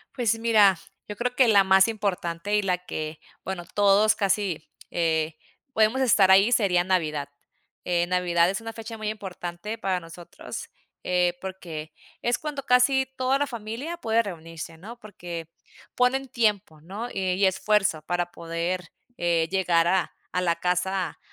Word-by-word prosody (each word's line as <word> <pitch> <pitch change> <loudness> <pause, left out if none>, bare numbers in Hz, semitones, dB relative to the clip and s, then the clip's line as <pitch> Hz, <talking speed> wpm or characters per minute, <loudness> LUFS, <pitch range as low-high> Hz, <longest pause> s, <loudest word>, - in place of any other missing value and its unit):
Pues 230 -3 +1
mira, 210 -5 +5 0.3
yo 210 - -6
creo 245 +3 -2
que 255 -1 +5
la 205 -3 +6
más 190 +1 +5
importante, 200 -3 -2
y 210 - +3
la 180 -2 0
que 155 0 -5 0.2
bueno 185 -2 -5
todos 205 +1 +5
casi, 195 -5 -1 0.2
eh, 160 -2 0 0.4
podemos 220 +4 +3
estar 205 -6 +5
ahí 195 +5 +6
sería 190 -6 +3
Navidad. 155 -6 -1 0.6
Eh, 175 -1 +1
Navidad 175 -1 +2
es 195 - -2
una 225 0 -7
fecha 225 0 -8
muy 215 -1 -3
importante 190 0 -6
para 190 -4 -1
nosotros, 170 0 -9 0.3
eh, 180 -1 +1
porque 165 -5 -7 0.3
es 240 0 +1
cuando 295 -3 -5
casi 265 +1 +4
toda 260 +1 +1
la 290 - +1
familia 235 +9 -5
puede 230 -6 +1
reunirse, 165 -4 -8
¿no? 225 +8 -10
Porque 175 -6 -8 0.5
ponen 265 +2 +2
tiempo, 210 -10 0
¿no? 200 +8 -6
Eh, 185 -3 -1
y 195 +2 +3
esfuerzo 190 -3 +2
para 175 +2 -2
poder, 170 +2 -3 0.3
eh, 170 -1 +1
llegar 175 -3 +2
a 185 0 +1 0.2
a 180 - +1
la 170 -2 +1
casa 180 +1 -1
190 Hz, 155 wpm, -25 LUFS, 175-220 Hz, 0.6 s, la